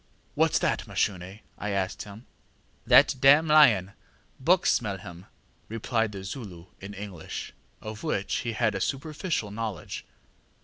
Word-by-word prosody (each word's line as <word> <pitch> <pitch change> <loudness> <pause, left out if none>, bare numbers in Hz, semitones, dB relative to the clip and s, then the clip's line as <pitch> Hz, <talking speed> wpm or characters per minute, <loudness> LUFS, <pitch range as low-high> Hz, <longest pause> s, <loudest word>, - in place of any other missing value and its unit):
ŌĆ£ŌĆśWhatŌĆÖs - - +3
that, - - 0
Mashune? 95 -4 0
ŌĆÖ 95 +4 -10 0.2
I 105 - -3
asked. 95 -1 -2 0.9
ŌĆ£ŌĆśThat 130 - +6
dam 145 +4 +6
lion; 110 -11 +5 0.5
buck 175 +7 +3
smell 105 -4 +1
him, 90 -2 -11
ŌĆÖ - - -37
replied 115 0 -1
the 100 -2 -7
Zulu 95 -6 -8
in 100 +1 -9
English, 100 -5 -7 0.3
of 110 0 -7
which 100 - -1
he 115 -1 -3
had 110 -1 +1
a 95 - -3
very - - -6
superficial 150 - -2
knowledge. 110 -4 -5
105 Hz, 145 wpm, -27 LUFS, 95-125 Hz, 0.9 s, ŌĆ£ŌĆśThat